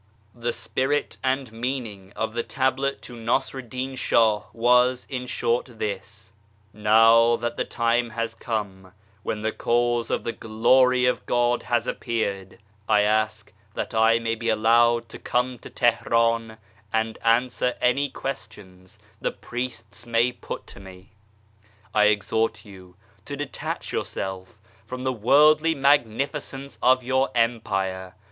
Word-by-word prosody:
ACTION -, -, -35 dB
71 120 Hz, -, -19 dB
The 120 Hz, -, +1 dB
spirit 140 Hz, +3 st, -1 dB
and 130 Hz, -2 st, -1 dB
meaning 115 Hz, -5 st, -4 dB
of 110 Hz, 0 st, -2 dB
the 120 Hz, -, -1 dB
Tablet 135 Hz, +2 st, -1 dB
to 125 Hz, -, -9 dB
Nassar 120 Hz, +3 st, -1 dB
ed 125 Hz, -3 st, -10 dB
din 130 Hz, +2 st, -4 dB
Shah 110 Hz, -4 st, +3 dB
was, 125 Hz, +2 st, +3 dB
in 125 Hz, -1 st, -4 dB
short, 120 Hz, 0 st, -1 dB
this: 100 Hz, -1 st, -6 dB, 0.2 s
" 105 Hz, 0 st, -35 dB
Now 115 Hz, +2 st, +5 dB
that 120 Hz, 0 st, -3 dB
the -, -, -2 dB
time 115 Hz, 0 st, 0 dB
has 115 Hz, 0 st, -3 dB
come, 100 Hz, -5 st, -5 dB, 0.3 s
when 105 Hz, +1 st, -4 dB
the 110 Hz, -, 0 dB
Cause 120 Hz, 0 st, 0 dB
of -, -, -1 dB
the 115 Hz, -, -2 dB
Glory 125 Hz, +3 st, +3 dB
of 125 Hz, -, +1 dB
God 120 Hz, 0 st, +2 dB
has 120 Hz, -1 st, 0 dB
appeared, 100 Hz, -5 st, -3 dB, 0.3 s
I 105 Hz, -1 st, +5 dB
ask 110 Hz, +1 st, 0 dB, 0.2 s
that -, -, -4 dB
I 110 Hz, +1 st, +4 dB
may 115 Hz, -1 st, -1 dB
be 115 Hz, 0 st, -3 dB
allowed 115 Hz, +2 st, +3 dB
to -, -, -10 dB
come 125 Hz, 0 st, -1 dB
to -, -, -11 dB
Teheran 115 Hz, -1 st, +1 dB, 0.3 s
and 110 Hz, 0 st, -1 dB
answer 125 Hz, +2 st, +2 dB
any 140 Hz, +3 st, +2 dB
questions 105 Hz, -10 st, -8 dB, 0.2 s
the -, -, 0 dB
priests 120 Hz, -3 st, -7 dB
may 120 Hz, +1 st, +2 dB
put 125 Hz, -, -8 dB
to -, -, -13 dB
me. 95 Hz, -1 st, -13 dB, 0.8 s
"I 105 Hz, -1 st, +4 dB
exhort 110 Hz, +2 st, +1 dB
you 95 Hz, -3 st, -14 dB, 0.3 s
to 140 Hz, -, -6 dB
detach 145 Hz, -1 st, -5 dB
yourself 95 Hz, +1 st, -4 dB, 0.3 s
from 125 Hz, 0 st, -7 dB
the 130 Hz, 0 st, 0 dB
worldly 150 Hz, +7 st, +4 dB
magnificence 140 Hz, +1 st, 0 dB
of 130 Hz, 0 st, +4 dB
your 130 Hz, +2 st, +1 dB
Empire. 95 Hz, -6 st, -1 dB
115 Hz, 145 wpm, -24 LUFS, 110-125 Hz, 0.8 s, Now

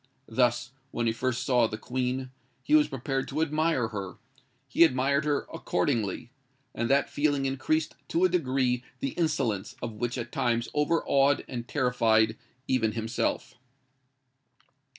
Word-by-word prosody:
Thus, 120 Hz, +1 st, +1 dB, 0.2 s
when 120 Hz, -2 st, -2 dB
he 115 Hz, -, +2 dB
first 130 Hz, +2 st, -2 dB
saw 125 Hz, -4 st, +4 dB
the 110 Hz, -, -5 dB
Queen, 130 Hz, +2 st, -2 dB, 0.3 s
he 300 Hz, -, -1 dB
was 305 Hz, -1 st, +6 dB
prepared 135 Hz, +1 st, -3 dB
to 145 Hz, -, -3 dB
admire 155 Hz, -6 st, +1 dB
her:—he 130 Hz, -, -2 dB
admired 140 Hz, 0 st, +2 dB
her 145 Hz, -1 st, 0 dB
accordingly; 120 Hz, -, -1 dB, 0.4 s
and 115 Hz, -, -2 dB
that 140 Hz, +1 st, +3 dB
feeling 145 Hz, -2 st, 0 dB
increased 135 Hz, +4 st, 0 dB
to 170 Hz, +2 st, +1 dB
a -, -, +4 dB
degree 130 Hz, -7 st, +1 dB, 0.2 s
the 135 Hz, -, -1 dB
insolence 130 Hz, -, -1 dB
of 115 Hz, -, -5 dB
which 120 Hz, +3 st, -3 dB
at 120 Hz, -1 st, -5 dB
times 120 Hz, -1 st, 0 dB
overawed 145 Hz, -2 st, +2 dB
and 120 Hz, -2 st, -5 dB
terrified 115 Hz, -5 st, +2 dB, 0.3 s
even 115 Hz, -4 st, +1 dB
himself. 115 Hz, +2 st, -2 dB
130 Hz, 135 wpm, -28 LUFS, 120-140 Hz, 0.4 s, was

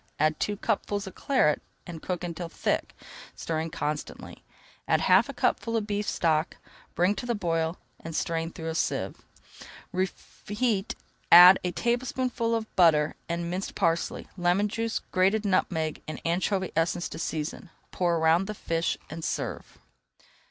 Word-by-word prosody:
Add 155 Hz, +1 st, +1 dB
two 205 Hz, 0 st, -1 dB
cupfuls 205 Hz, -1 st, -1 dB
of 190 Hz, -, -8 dB
Claret 255 Hz, -, +2 dB, 0.2 s
and 165 Hz, -3 st, -8 dB
cook 180 Hz, -1 st, -3 dB
until 170 Hz, 0 st, -5 dB
thick, -, -, -2 dB, 0.4 s
stirring 160 Hz, 0 st, -3 dB
constantly. 150 Hz, -1 st, -5 dB, 0.4 s
Add -, -, +3 dB
half -, -, +5 dB
a -, -, -4 dB
cupful 230 Hz, -1 st, 0 dB
of 215 Hz, -, -1 dB
beef 205 Hz, 0 st, -2 dB
stock, 160 Hz, 0 st, 0 dB, 0.4 s
bring 180 Hz, +3 st, +3 dB
to 225 Hz, +4 st, -6 dB
the 240 Hz, -, 0 dB
boil, 165 Hz, -3 st, -1 dB, 0.2 s
and 165 Hz, -1 st, -7 dB
strain 165 Hz, 0 st, -1 dB
through 165 Hz, 0 st, -6 dB
a -, -, -2 dB
sieve. 165 Hz, -, -2 dB, 0.7 s
Reheat, 205 Hz, +3 st, -2 dB, 0.4 s
add 180 Hz, +2 st, +10 dB
a 180 Hz, -, -1 dB
tablespoonful 240 Hz, 0 st, -1 dB
of 220 Hz, -1 st, -5 dB
butter, 155 Hz, -4 st, +4 dB, 0.2 s
and 170 Hz, 0 st, -2 dB
minced 185 Hz, +2 st, -4 dB
parsley, 165 Hz, -2 st, 0 dB
lemon 180 Hz, +3 st, +2 dB
juice, 225 Hz, +1 st, -2 dB
grated 195 Hz, +4 st, +2 dB
nutmeg, 160 Hz, -5 st, 0 dB
and 155 Hz, -, -5 dB
anchovy 185 Hz, +2 st, 0 dB
essence 170 Hz, +2 st, 0 dB
to 160 Hz, -, -7 dB
season. 160 Hz, +2 st, -4 dB, 0.2 s
Pour 175 Hz, -2 st, +1 dB
around 165 Hz, +4 st, +3 dB
the 215 Hz, -, -4 dB
fish 165 Hz, -3 st, -1 dB
and 160 Hz, +2 st, -7 dB
serve. -, -, -4 dB
175 Hz, 150 wpm, -27 LUFS, 165-205 Hz, 0.7 s, add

